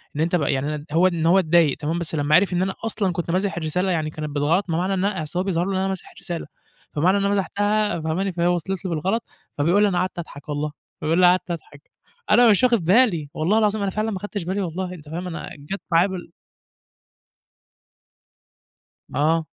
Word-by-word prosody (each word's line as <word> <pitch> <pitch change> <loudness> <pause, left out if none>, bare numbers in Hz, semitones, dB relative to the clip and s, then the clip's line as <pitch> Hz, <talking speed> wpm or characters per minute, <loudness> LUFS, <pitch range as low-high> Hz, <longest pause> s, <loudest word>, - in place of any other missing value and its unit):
إن 150 - -1
أنت 170 +2 +1
بقى 150 -5 +1
يعني" 145 +2 -2
هو 175 +3 +5
إن 170 -3 -1
هو 180 +4 +5
إتضايق 165 -4 +3
تمام 160 +3 -2
بس 160 -1 -3
لمّا 145 +1 +2
عرف 185 +1 +4
إن 175 - +1
أنا 190 0 0
أصلًا 205 -4 0
كنت 170 0 -3
ماسح 190 +1 0
الرسالة، 180 +3 0
يعني 155 -3 0
كانت 155 0 -5
بالغلط 150 +7 +1
ما 165 - 0
معنى 185 +2 0
إنها 190 -3 0
أصل 175 +4 -4
هو - - +1
بيظهر 180 -2 0
له 195 - -2
إن 190 - 0
أنا 190 0 0
ماسح 190 -2 -5
الرسالة، 170 -4 -6 0.5
فمعنى 180 +7 +3
إن 200 - 0
أنا 200 - +2
مسحتها، 205 0 0
فهماني، 175 +5 -1
فهي 170 0 +1
وصلت 180 +2 -1
له 185 - -2
بالغلط. 190 +8 -1 0.3
فبيقول 170 +8 +3
لي: - - +5
"أنا 180 - -1
قعدت 185 -1 -2
أضحك 150 -3 -9
والله." 145 +1 -2 0.3
بيقُول 160 +3 +1
لي: 180 - +6
"قعدت 180 0 +3
أضحك." 150 -3 -9 0.4
أنا 240 -1 +7
مش 205 - +3
واخد 235 -8 +3
بالي، 185 - +3
والله 175 +8 +1
العظيم 215 -1 +2
أنا 195 - 0
فعلًا 215 +2 -1
ما 195 - -3
أخدتش 205 -1 -5
بالي 190 +4 -2
والله، 180 +1 -3
أنت 150 -4 -12
فاهم، 175 +3 -4
أنا 170 - -6
جات 190 +8 -6
معايا 170 +3 +5
بال 180 -3 -7 2.8
آه. 160 +3 +2
175 Hz, 215 wpm, -23 LUFS, 160-195 Hz, 2.8 s, أنا